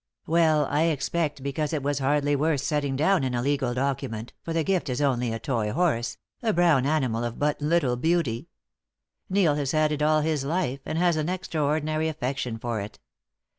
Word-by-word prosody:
"Well, 160 -2 +3
I 150 +4 +1
expect 150 -1 -1
because 145 +2 -2
it 150 -3 -1
was 145 0 0
hardly 145 +1 +2
worth 150 -1 +1
setting 145 -4 -1
down 165 +4 +2
in 130 -1 -1
a 120 - 0
legal 135 -3 0
document, 125 -4 -2
for 165 - -6
the 165 -1 +1
gift 185 -3 0
is 125 - -2
only 125 -4 +1
a 115 - -2
toy 115 -4 -1
horse, 120 -7 0 0.2
a 225 -3 +1
brown 165 -6 +3
animal 130 -7 0
of 120 -1 -4
but 150 0 0
little 145 -5 +2
beauty. 150 -5 0 0.8
Neil 185 -5 +3
has 145 -2 -1
had 155 -1 +2
it 150 0 -2
all 155 0 +3
his 155 -2 0
life, 140 -3 -1
and 160 - -2
has 175 -1 +3
an 155 +2 -1
extraordinary 155 -3 -1
affection 135 -6 -3
for 115 -1 -3
it. 105 +2 -8
145 Hz, 190 wpm, -26 LUFS, 130-160 Hz, 0.8 s, Well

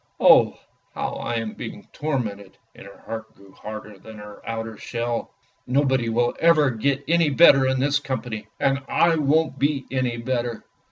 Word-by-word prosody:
Oh, - - +6 0.4
how - - -3
I 120 - -3
am 115 -2 -3
being - - -8
tormented! 110 -10 -4
" - - -44
And - - -12
her 100 - -15
heart 110 0 -7
grew 100 -1 -18
harder 105 0 -9
than 110 +2 -12
her 105 0 -11
outer 115 -1 -4
shell. 120 0 -3 0.4
"Nobody 130 -2 +1
will 120 +1 +1
ever 155 -5 +4
get 135 +4 -1
any 165 -1 +3
better 135 -2 +6
in 130 0 +1
this 145 +2 +2
company! 120 -6 -5
and 135 0 +2
I 170 -1 +3
won't 150 0 +1
be 140 -1 0
any 130 -2 -1
better. 120 -1 -3
125 Hz, 170 wpm, -23 LUFS, 110-140 Hz, 0.4 s, Oh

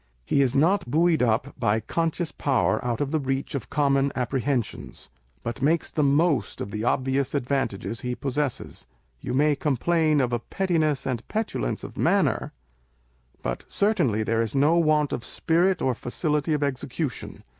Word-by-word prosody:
He 140 - +2
is 135 -2 +1
not 165 +1 +2
buoyed 165 +2 +3
up 125 +3 +1
by 110 -2 +2
conscious 165 +5 -2
power 135 -4 +1
out 120 0 -1
of 145 -1 -1
the 160 - +1
reach 135 -1 -2
of 140 - -4
common 140 -1 +2
apprehensions, 130 - -2 0.3
but 120 +1 -4
makes 160 +4 +1
the 155 - 0
most 145 0 +2
of 100 - -5
the 105 +1 -3
obvious 130 +3 0
advantages 120 -6 -2
he 125 0 -3
possesses. 135 - -3 0.3
You 125 - -4
may 150 +2 +3
complain 155 +2 +1
of 125 -2 +1
a 120 - +1
pettiness 155 0 0
and 125 -3 -3
petulance 210 - -2
of - - -9
manner, - - +2 0.9
but - - -3
certainly 170 - +1
there 115 +1 +1
is 115 +3 -2
no 145 +4 +4
want 155 -3 +2
of 120 - -3
spirit 175 +3 +1
or 130 - +2
facility 150 +5 -1
of 145 - -1
execution. 140 +1 -3
140 Hz, 160 wpm, -25 LUFS, 125-155 Hz, 0.9 s, no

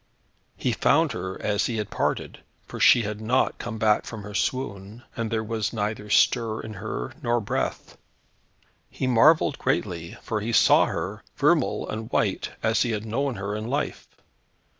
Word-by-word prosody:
He - - 0
found - - +3
her 95 +1 -5
as 105 -1 +1
he 115 - -3
had 105 -2 -3
parted, - - -2 0.3
for - - -8
she 120 - +6
had 105 +1 -4
not 120 +4 +1
come 110 - -5
back 110 -1 +3
from 110 -3 -8
her 105 +1 -8
swoon, 110 -2 -3
and 115 -2 -2
there 110 0 -1
was 110 -1 -2
neither 105 -1 -3
stir 115 0 +3
in 110 - -7
her, - - -4
nor 120 0 +1
breath. 105 - -3 0.9
He - - -4
marvelled 140 +5 +4
greatly, 90 -10 -2
for 110 -2 -2
he 115 +3 -3
saw - - +6
her, - - -4
vermeil - - +2
and 110 +1 -5
white, - - 0
as 110 +1 +2
he 120 -2 +1
had 105 0 -3
known 130 +4 -1
her 100 0 -4
in 110 +1 -4
life. 140 +4 -2
110 Hz, 170 wpm, -25 LUFS, 105-120 Hz, 0.9 s, she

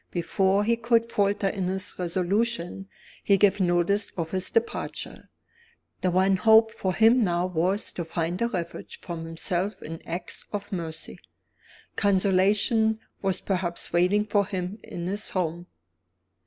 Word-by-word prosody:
Before 190 +3 +1
he 230 +2 +2
could 230 0 +1
falter 200 0 +1
in 195 -1 -1
his 190 +1 -1
resolution, 190 +2 -1 0.4
he 200 - +4
gave 205 0 +4
notice 180 +3 +2
of 165 -2 -3
his 185 -1 0
departure. 230 0 -3 0.7
The 185 - +2
one 190 +2 +3
hope 220 +2 +6
for 185 -4 -2
him 230 +2 +5
now 175 -2 +1
was 185 +3 -1
to 175 - -3
find 170 +3 -3
a 235 - +3
refuge 175 -7 -5
from 170 -2 -6
himself 175 +4 -2
in 165 +1 -7
acts 170 +1 -5
of 205 -1 -5
mercy. 165 -3 -5 0.8
Consolation 205 +3 +3 0.2
was 190 -1 0
perhaps 180 -4 -2
waiting 180 +5 +3
for 205 -2 +1
him 190 +2 -4
in 170 - -7
his 200 +4 -2
Home. 175 -1 -2
190 Hz, 140 wpm, -26 LUFS, 175-205 Hz, 0.8 s, hope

